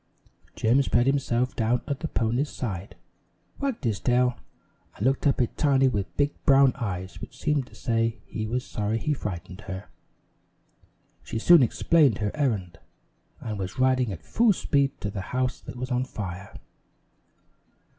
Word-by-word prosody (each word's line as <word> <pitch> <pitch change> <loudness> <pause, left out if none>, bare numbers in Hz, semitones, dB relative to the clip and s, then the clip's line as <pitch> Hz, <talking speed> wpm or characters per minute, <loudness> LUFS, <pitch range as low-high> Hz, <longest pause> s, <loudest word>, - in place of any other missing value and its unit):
Jim 120 +5 +3
spread 120 -2 +2
himself 130 -2 +1
down 115 +2 +1
at 140 -2 -2
the 160 - -3
pony's 125 +3 0
side, 100 -5 -5 0.6
wagged 275 -4 -2
his 110 -6 0
tail, 125 0 +2 0.6
and 105 - -3
looked 135 +2 +2
up 140 - +2
at 120 - 0
Tiny 135 -3 +4
with 100 -8 -2
big 145 0 +2
brown 135 -2 +6
eyes 95 -4 -5
which - - -9
seemed 150 -4 0
to - - -17
say 115 -1 0
he 110 0 -4
was 125 +3 -2
sorry 105 +1 -2
he 150 +6 0
frightened 95 - -6
her. 95 +2 -6 1.3
She - - -5
soon 170 +7 +7
explained 135 0 +3
her 105 -1 -1
errand 110 - -1 0.6
and 105 -3 -4
was 95 +4 -5
riding 130 -3 +2
at 90 - -7
full 230 -2 +3
speed 140 -5 0
to 105 - -3
the 100 - -4
house 125 +5 -2
that - - -9
was 125 +1 -5
on 125 +1 +1
fire. 100 -5 -7
125 Hz, 160 wpm, -26 LUFS, 105-135 Hz, 1.3 s, soon